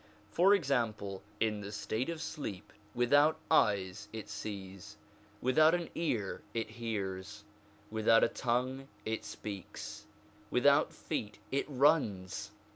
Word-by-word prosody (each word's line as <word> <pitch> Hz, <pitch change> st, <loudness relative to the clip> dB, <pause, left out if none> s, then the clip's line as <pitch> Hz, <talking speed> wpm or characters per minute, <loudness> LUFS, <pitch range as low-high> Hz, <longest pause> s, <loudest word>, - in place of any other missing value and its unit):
For 195 Hz, +4 st, +6 dB
example, 115 Hz, -, -1 dB, 0.2 s
in 105 Hz, -2 st, +1 dB
the 100 Hz, 0 st, -6 dB
state 110 Hz, +5 st, -2 dB
of 165 Hz, -1 st, -3 dB
sleep 145 Hz, -, -6 dB, 0.2 s
without 145 Hz, +6 st, +4 dB
eyes 100 Hz, -, +2 dB
it 110 Hz, -2 st, -7 dB
sees, 95 Hz, -3 st, -7 dB, 0.4 s
without 155 Hz, +6 st, +5 dB
an 175 Hz, -1 st, -4 dB
ear 120 Hz, -, -1 dB
it 115 Hz, -1 st, -2 dB
hears, 100 Hz, -4 st, -4 dB, 0.5 s
without 110 Hz, +1 st, +5 dB
a -, -, +6 dB
tongue 130 Hz, +2 st, -1 dB, 0.2 s
it 110 Hz, 0 st, -2 dB
speaks, 100 Hz, -4 st, -7 dB, 0.4 s
without -, -, +4 dB
feet 105 Hz, 0 st, -4 dB
it 140 Hz, -, 0 dB
runs. 130 Hz, -, +2 dB
115 Hz, 120 wpm, -33 LUFS, 100-140 Hz, 0.5 s, For